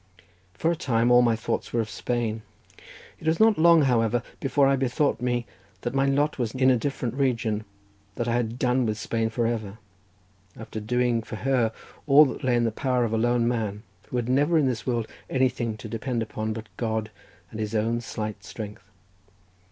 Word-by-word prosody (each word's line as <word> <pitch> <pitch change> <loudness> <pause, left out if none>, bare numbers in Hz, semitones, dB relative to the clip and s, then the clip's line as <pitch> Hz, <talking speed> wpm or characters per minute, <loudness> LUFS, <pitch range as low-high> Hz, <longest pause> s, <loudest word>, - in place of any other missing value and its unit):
For 165 - +1
a - - 0
time 120 -5 +1
all 125 0 +7
my 120 -2 +3
thoughts 115 - -3
were 120 - 0
of 110 - 0
Spain. 110 +2 -2 0.8
It 160 - -7
was 160 +1 +2
not 220 -4 +5
long, 165 -1 +6
however, 120 -2 +2 0.2
before 140 0 +2
I 135 0 +4
bethought 130 -1 0
me 120 -1 0 0.4
that 120 - -3
my 135 0 +2
lot 145 +1 +1
was 120 0 -2
now 130 - -5
in 130 - +6
a - - +4
different 125 -1 -2
region, 115 -5 0 0.5
that 120 - -2
I 115 - +1
had 120 -1 -1
done 125 -1 +1
with 105 -1 -1
Spain 115 0 -1
for 115 +1 -1
ever, 110 -3 -2 0.8
after 110 0 -6
doing 120 +1 +1
for 110 - -8
her 120 -1 +1 0.4
all 145 +2 +8
that 130 - -5
lay 125 -2 +2
in 120 - +2
the 115 - +1
power 125 +2 0
of 115 - -3
a - - +2
lone 120 0 +2
man, 110 -3 -2 0.2
who - - -6
had 120 -1 -1
never 145 +6 +3
in 150 - +3
this 125 -3 -2
world 120 -3 0 0.2
anything 120 -4 0
to 110 - -8
depend 115 +2 -2
upon, 110 0 -4
but 110 0 -6
God 110 -2 -2 0.4
and 110 - -7
his 110 0 -3
own 115 +2 0
slight 110 -2 -5
strength. 105 -4 -8
120 Hz, 200 wpm, -26 LUFS, 110-130 Hz, 0.8 s, all